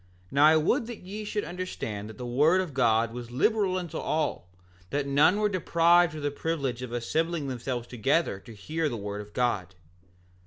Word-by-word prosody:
6:5 - - -29
Now 140 +2 +5
I 160 +1 +6
would 225 - +1
that 240 -2 -8
ye 205 +4 -6
should 210 0 -2
understand 115 - -5
that 110 - -11
the 125 - -6
word 150 +9 +3
of 180 -6 -3
God 115 -3 +2
was 120 -1 -7
liberal 185 - +1
unto 170 -3 -4
all, 150 - -2 0.4
that 145 0 -1
none 145 +7 +4
were 210 - +3
deprived 175 -3 +3
of 150 - -6
the 145 - 0
privilege 140 -5 -2
of 125 -2 -6
assembling 155 +6 -1
themselves 125 -1 -3
together 125 -1 0
to 115 +3 -13
hear 155 +9 -2
the 120 - -4
word 105 0 -5
of 105 0 -12
God. 100 -8 -1
145 Hz, 195 wpm, -28 LUFS, 120-170 Hz, 0.4 s, I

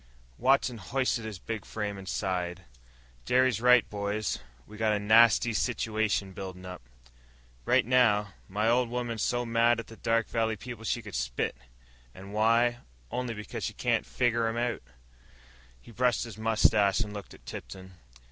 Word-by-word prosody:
Watson 130 -2 +2
hoisted 120 +2 -1
his 110 -3 -6
big 110 +3 -5
frame, 105 -2 -4
and 95 -1 -8
sighed. 90 -2 -2 0.6
"Jerry's 125 - +2
right, 125 -2 +6
boys. 105 -1 -2 0.3
We 110 - -13
got 110 0 +1
a 105 - 0
nasty 115 +2 +5
situation 105 +1 0
building 95 -1 -8
up. 90 -4 -8 0.8
Right - - +3
now, 105 -5 +3 0.2
my 105 +3 0
old 120 +1 +3
woman's 120 -2 -3
so 120 +2 0
mad 115 0 +3
at 115 - -5
the 115 +2 -13
Dark 115 -1 +1
Valley 110 -1 0
people 115 +1 -9
she 120 - -1
could 100 -2 -10
spit. - - -2 0.6
And 100 +2 -10
why? 115 +3 +3 0.3
Only 125 -2 -3
because 105 0 -6
she - - -3
can't - - 0
figger 120 -2 +1
'em 115 +1 -2
out." 120 0 -1 1.0
He 115 - -15
brushed 125 +1 +1
his 115 -3 -8
mustache 110 -2 +3
and 105 -2 -3
looked 100 -1 -8
at - - -21
Tipton. 95 0 -9
110 Hz, 160 wpm, -29 LUFS, 100-120 Hz, 1.0 s, right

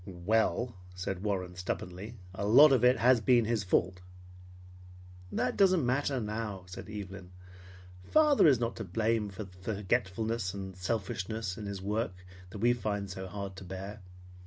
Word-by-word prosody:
"Well, 110 +6 0
" 90 0 -18
said 95 0 -4
Warren 95 -3 -2
stubbornly, 95 +4 -5 0.2
"a 95 - -4
lot 140 +7 +8
of 130 -3 +3
it 125 +1 +6
has 125 -1 +4
been 120 +1 +4
his 110 -2 0
fault." 90 0 +1 1.3
"That 125 - 0
doesn't 185 -7 +4
matter 135 +2 +1
now," 105 -3 -4
said 90 +3 -9
Evelyn. 100 -3 -7 0.8
"Father 300 - +5
is 135 -6 +5
not 115 -1 -1
to 115 - -4
blame 110 +3 0
for 100 +2 -6
the 95 -2 -13 0.2
forgetfulness 100 +1 -1
and 95 -1 -6
selfishness 95 +1 -3
in 105 0 -6
his 100 -1 -5
work 105 -1 -1 0.3
that 95 - -8
we 120 +4 +3
find 100 -4 -3
so 95 0 -6
hard 100 0 -6
to 95 - -8
bear. 95 +3 -7
105 Hz, 160 wpm, -31 LUFS, 95-115 Hz, 1.3 s, lot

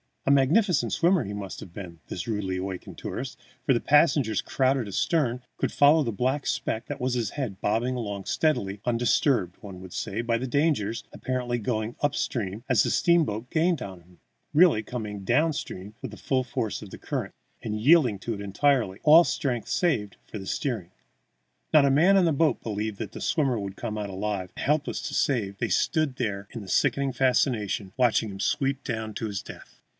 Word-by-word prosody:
A 140 - +3
magnificent 140 - +3
swimmer 175 -2 +3
he 100 - -5
must 100 -2 -6
have 85 - -11
been, 85 -4 -9
this 85 - -5
rudely 100 -4 -2
awakened 95 0 -6
tourist, - - -5 0.3
for - - +4
the 120 - +2
passengers, 145 -6 +3
crowded 130 -3 +1
astern, 125 - 0 0.2
could - - -1
follow 150 +2 +5
the 115 - -2
black 130 +6 -1
speck 115 -2 -2
that - - -5
was 125 0 0
his 115 -5 -1
head 125 -10 -4
bobbing 120 +5 0
along 100 -5 -4
steadily, 105 -11 0
undisturbed, 120 - +1
one 95 -3 -9
would 95 -2 -10
say, 110 +2 -3
by 115 -1 0
dangers, 130 -3 0
apparently 125 -1 -2
going 110 0 -2
up 145 -1 +1
stream 105 -2 -2
as 120 -6 +5
the - - 0
steamboat 125 -10 +2
gained 165 -2 +1
on 95 -5 -7
him 90 +1 -23 0.3
really 160 -8 +5
coming 105 -4 -5
down 155 +10 +2
stream 100 -7 -6
with 130 - -6
the 105 - -10
full 130 +6 0
force 115 -3 -3
of 105 -3 -10
the - - -8
current, 130 -10 -4 0.3
and 105 -3 -3
yielding 135 -5 +5
to 115 - -3
it 100 - -6
entirely, 105 0 +1
all 160 +3 +8
strength 125 -8 -2
saved 110 - 0
for 105 -3 -7
steering. 105 -5 -3 0.8
Not 150 -2 +7
a 140 - +4
man 170 +8 +5
on 190 -2 +5
the 165 - +3
boat 155 +2 +2
believed 105 -1 -3
that - - -5
the - - -8
swimmer 135 -7 +1
would 100 -1 -5
come 110 -1 -4
out 105 -1 -4
alive, 95 -1 -3
and, - - -4
helpless 150 +1 0
to - - -4
save, 105 -8 0
they - - -2
stood 155 -5 +1
there 100 -3 -3
in 110 -5 -7
sickening 140 +6 +1
fascination, 120 -6 +1
watching 120 -3 +2
him 95 -1 -8
sweep 135 +6 0
down 110 -3 -4
to 115 - -3
his 100 -2 -4
death. - - -12
120 Hz, 190 wpm, -26 LUFS, 100-140 Hz, 0.8 s, all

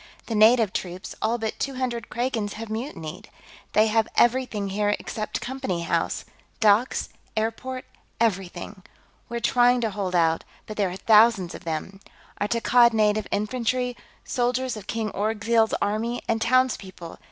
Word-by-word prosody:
"The 230 - -4
native 220 -1 +5
troops, 180 +1 -5
all 225 +2 +1
but 220 -2 -4
two 275 -1 -2
hundred 240 -4 -3
Kragans, 235 -4 -2
have 220 0 -7
mutinied. 210 - -6 0.4
They 215 +1 +5
have 220 0 +2
everything 240 -5 +2
here 205 +1 +1
except 215 -1 -4
Company 245 -10 -3
House - - -1 0.3
docks, 220 +2 +3 0.3
airport, 255 +4 -2 0.3
everything. 195 -2 -2 0.5
We're 235 0 -3
trying 245 +1 +4
to 225 -2 0
hold 190 -2 -3
out, 165 -1 +3 0.2
but 215 - -7
there 200 -3 +1
are 180 - -6
thousands 215 -4 +5
of - - -10
them. 165 +4 -4 0.4
Our 205 - 0
Takkad 235 +1 +4
Native 215 -1 +2
Infantry, 245 +3 -1 0.3
soldiers 250 0 0
of 210 -3 -9
King 220 -2 -2
Orgzild's 220 +2 +1
army, 220 +4 -1
and 225 -1 0
townspeople. 230 -8 0
220 Hz, 145 wpm, -25 LUFS, 205-240 Hz, 0.5 s, native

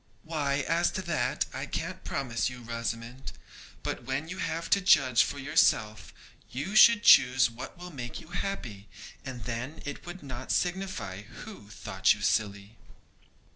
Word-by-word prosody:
'Why, 145 -4 -1
as 170 +1 +2
to 185 - -3
that, 170 -3 0
I - - -4
can't - - -4
promise 120 -4 -2
you, 125 -1 -10
Rosamond; 115 +2 -5 0.5
but, - - -4
when 135 +5 -3
you 180 +1 -6
have 165 -1 -2
to 200 - +4
judge 130 -9 +5
for - - -1
yourself, 110 - +1 0.4
you 145 - -4
should 230 0 +8
choose 130 - +6
what 115 +8 -9
will 180 +1 -9
make 120 -5 -6
you 160 - -14
happy, 120 - -5 0.3
and 125 -4 -7
then 120 +8 -5
it 145 - -6
would 175 -1 -8
not 130 -2 -6
signify 180 - -2
who 115 - -11
thought 95 -2 +1
you 105 - -12
silly.' 105 +1 -1
130 Hz, 155 wpm, -29 LUFS, 115-170 Hz, 0.5 s, should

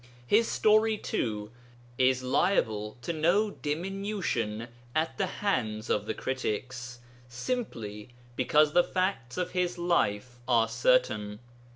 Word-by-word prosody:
His 220 - +4
story, 215 0 +3
too, 105 - -3 0.4
is 130 0 +2
liable 110 - +1
to 170 - -2
no 175 +7 +2
diminution 160 - -2 0.3
at 160 +1 0
the 195 - +2
hands 120 - -1
of 105 0 0
the 110 - -2
critics, 125 -1 -3 0.3
simply 120 - -4 0.3
because 150 +4 +3
the 175 - +6
facts 185 -11 -2
of 180 - -1
his 180 -1 0
life 125 -9 0
are 115 -3 +4
certain. 455 - +2
130 Hz, 115 wpm, -29 LUFS, 115-190 Hz, 0.4 s, the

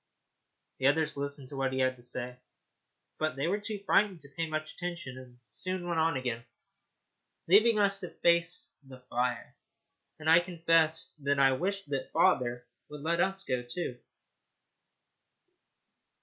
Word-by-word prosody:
The 130 - +3
others 155 +2 +2
listened 140 -1 -4
to 140 - -8
what 135 -1 0
he - - -2
had 130 -1 +2
to - - -15
say, 125 0 -5 0.8
but 155 -4 0
they 135 - -1
were 200 +4 +1
too 210 0 -4
frightened 200 -2 +2
to 140 - -15
pay 165 0 -1
much 155 0 -3
attention, 170 -7 -5
and 130 -1 -12
soon 185 - -3
went 170 -2 0
on 160 -2 +2
again, 120 -3 -3 1.0
leaving 215 +5 +6
us 200 -1 +3
to 180 - -6
face 170 +1 +1
the 130 -1 -13
fire. 125 +1 -1 0.6
And 155 0 -7
I 165 +2 +8
confess 165 -2 +1
that 140 0 +1
I 135 -1 +6
wished 195 +7 -2
that 135 -2 -2
father 120 -1 +2 0.2
would 150 -1 -8
let 170 +3 +1
us 195 0 0
go, 125 -7 -1
too. 125 +1 -5
155 Hz, 155 wpm, -30 LUFS, 130-175 Hz, 1.0 s, I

